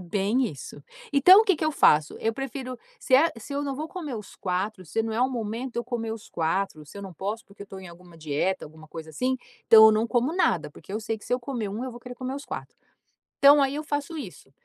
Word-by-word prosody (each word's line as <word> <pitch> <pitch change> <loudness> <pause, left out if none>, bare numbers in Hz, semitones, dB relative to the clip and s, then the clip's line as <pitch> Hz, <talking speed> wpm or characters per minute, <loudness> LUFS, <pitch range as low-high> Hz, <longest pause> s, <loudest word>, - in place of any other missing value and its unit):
Bem 200 +8 0
isso. 145 - -8 0.3
Então, 365 +9 +8
o - - +2
que 385 -6 +3
que 310 - -2
eu 310 - +1
faço: 150 - +4
eu 225 - 0
prefiro 260 -1 -5 0.2
se 260 - +2
é 320 +5 +5
se 255 +6 -9
eu 285 +1 -1
não 275 -2 -3
vou 310 +3 -5
comer 305 -9 -6
os 210 -3 -9
4, 185 +1 -3
se 225 +8 -1
não 225 0 -3
é 230 - -1
o 255 - +3
momento 235 +2 -4
de - - -4
eu 235 - -2
comer 230 -2 -3
os 225 - -9
4, 165 -1 -1
se 155 - -13
eu - - -7
não 190 -2 -8
posso, 210 - -4
porque 200 0 -13
eu - - -11
tô 195 -1 -9
em 185 - -10
alguma 170 0 -15
dieta, 155 +5 -1
alguma 155 +1 -13
coisa 160 0 -9
assim, 255 - -1 0.3
então 220 -1 +10
eu - - +8
não 220 +2 +1
como 245 +5 +1
nada. 160 - +1
Porque 165 +5 -12
eu 215 - -2
sei 225 0 -3
que, - - -16
se - - -4
eu 250 - +1
comer 240 -4 -4
1, 210 +4 -4
eu 260 - -4
vou 240 - -10
querer 245 +1 -9
comer 255 +1 -5
os 285 - -7
4. - - -7 0.6
Então 285 +1 +8
aí 275 0 +2
eu 300 - -3
faço 290 +2 -3
isso, 190 - -9
225 Hz, 270 wpm, -26 LUFS, 190-265 Hz, 0.6 s, então